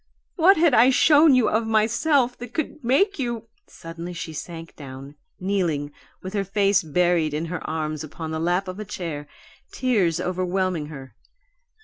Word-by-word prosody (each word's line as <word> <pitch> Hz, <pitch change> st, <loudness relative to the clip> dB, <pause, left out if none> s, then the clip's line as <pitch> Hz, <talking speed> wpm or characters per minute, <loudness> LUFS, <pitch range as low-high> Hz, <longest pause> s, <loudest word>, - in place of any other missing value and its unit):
What 370 Hz, +3 st, +5 dB
had 320 Hz, -3 st, +4 dB
I 245 Hz, +2 st, +6 dB
shown 295 Hz, +2 st, +6 dB
you 250 Hz, -3 st, +3 dB
of 220 Hz, +1 st, 0 dB
myself 240 Hz, +4 st, +2 dB
that 245 Hz, 0 st, -9 dB
could 305 Hz, -2 st, -3 dB
make 300 Hz, -, +2 dB
you 235 Hz, -3 st, -3 dB
" 410 Hz, -, -40 dB
Suddenly 165 Hz, +1 st, -8 dB
she 160 Hz, -1 st, -6 dB
sank 165 Hz, +2 st, -8 dB
down, 135 Hz, 0 st, -10 dB, 0.3 s
kneeling, 175 Hz, -7 st, -1 dB, 0.3 s
with 185 Hz, +1 st, -6 dB
her 200 Hz, -2 st, 0 dB
face 200 Hz, 0 st, +2 dB
buried 165 Hz, -1 st, +1 dB
in 155 Hz, +2 st, -2 dB
her 180 Hz, -, -4 dB
arms 155 Hz, -1 st, -3 dB
upon 160 Hz, +1 st, -7 dB
the 160 Hz, -, -3 dB
lap 175 Hz, +4 st, 0 dB
of 185 Hz, +2 st, -6 dB
a -, -, -3 dB
chair, 160 Hz, -6 st, -6 dB, 0.4 s
tears 200 Hz, -11 st, +1 dB
overwhelming 185 Hz, -2 st, -1 dB
her. 135 Hz, -5 st, -10 dB
185 Hz, 165 wpm, -23 LUFS, 160-235 Hz, 0.4 s, I